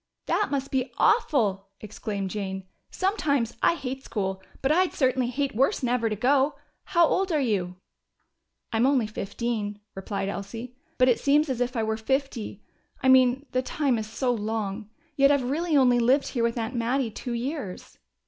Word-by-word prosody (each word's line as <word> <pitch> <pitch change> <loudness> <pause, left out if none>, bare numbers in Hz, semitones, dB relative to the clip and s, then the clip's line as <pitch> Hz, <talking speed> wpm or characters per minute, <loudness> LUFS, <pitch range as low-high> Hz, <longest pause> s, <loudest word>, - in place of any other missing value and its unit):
"That 420 - +1
must 275 -1 -2
be 260 -1 -1
awful!" 210 - +2
exclaimed 205 -2 -5
Jane. 190 -2 -4 0.3
"Sometimes 285 - 0
I - - +4
hate 265 -3 -5
school, 190 -3 -3 0.2
but 270 - +3
I'd 365 +3 +3
certainly 260 -2 +1
hate 270 0 -2
worse 270 - +2
never 240 -2 +1
to 215 - -2
go. 275 +6 +2 0.3
How 340 -1 +4
old 375 +3 +1
are 310 - +2
you?" 195 -9 -1 1.0
"I'm 230 +3 +3
only 265 -5 +3
fifteen," 210 0 -3
replied 195 0 -4
Elsie. 225 +5 -6 0.2
"But 255 - +4
it 245 - +3
seems 295 +2 +3
as 250 -2 -2
if 245 +1 -1
I 225 - 0
were 220 0 -1
fifty. 240 -3 -2 0.4
I 260 - +4
mean 260 +1 +5
the 255 - +1
time 260 -2 0
is 215 - -4
so 245 +3 0
long. 215 -1 -3 0.3
Yet 275 0 +5
I've 270 -3 +2
really 320 +1 +1
only 250 -2 +5
lived 255 +4 +3
here 245 - -2
with 230 +1 0
Aunt 225 +1 -2
Mattie 240 0 0
two 245 +3 -5
years." 245 - -5
245 Hz, 175 wpm, -26 LUFS, 220-275 Hz, 1.0 s, mean